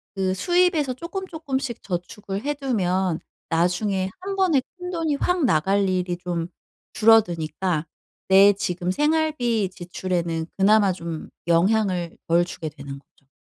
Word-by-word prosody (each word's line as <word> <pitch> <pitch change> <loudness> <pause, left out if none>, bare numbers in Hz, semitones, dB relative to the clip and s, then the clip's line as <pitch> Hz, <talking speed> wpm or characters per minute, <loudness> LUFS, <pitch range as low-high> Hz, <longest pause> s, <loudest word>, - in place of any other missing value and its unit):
그 190 -1 0
수입에서 345 - +2
쪼끔 360 +8 -6
쪼끔씩 270 -7 -4
저축을 195 +3 -5
해 295 +1 0
두면 190 - 0 0.3
나중에 185 +3 +1
1 390 +1 -4
번에 350 -9 +3 0.2
큰 360 0 -6
돈이 330 -4 -1
확 350 +1 +1
나갈 195 +2 +2
일이 180 -1 -1
좀 175 -1 -3 0.5
줄어드니까 175 -6 +2 0.4
내 195 +1 +7
지금 180 -2 -3
생활비 295 -6 +1
지출에는 175 -2 -3
그나마 200 0 +5
좀 170 -3 -6 0.2
영향을 180 0 +1
덜 170 +1 +4
주게 165 -2 -6
되는 140 -2 -9
거죠. 140 -1 -32
190 Hz, 265 characters per minute, -23 LUFS, 175-265 Hz, 0.5 s, 내